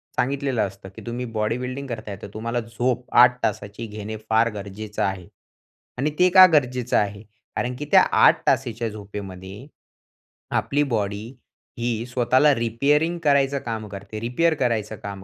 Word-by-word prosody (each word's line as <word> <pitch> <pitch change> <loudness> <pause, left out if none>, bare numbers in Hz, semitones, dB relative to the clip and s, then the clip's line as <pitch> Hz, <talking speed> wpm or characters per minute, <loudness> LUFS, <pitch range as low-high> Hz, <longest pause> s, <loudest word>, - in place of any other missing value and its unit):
सांगितलेलं 135 -2 0
असतं, 95 0 -12
की - - -10
"तुम्ही 120 +1 -4
बॉडीबिल्डिंग 125 +5 -2
करताय, 110 -4 -6
तर - - -7
तुम्हाला 115 +2 -2
झोप 120 +2 -2
8 125 0 +6
तासाची 105 +2 -3
घेणे 110 +1 -6
फार 110 +1 +3
गरजेच 105 +1 -7
आहे 95 -2 -1 0.7
आणि 145 +4 0
ते 180 0 +6
का 185 0 +11
गरजेच 125 -4 +1
आहे? 100 0 +1 0.3
कारण 125 0 -2
की 150 - -4
त्या - - +8
8 - - +5
तासाच्या 115 -2 0
झोपेमध्ये 100 +1 -9 0.9
आपली 145 +1 0
बॉडी 115 +2 -5
स्वतःला 130 +4 +3
रिपेअरिंग 140 +9 +1
करायचं 140 -1 +3
काम 110 -2 -4
करते. 100 +2 -8
रिपेअर 125 +9 +1
करायचं 110 -4 -1
काम 100 -1 -7
115 Hz, 140 wpm, -23 LUFS, 105-130 Hz, 0.9 s, का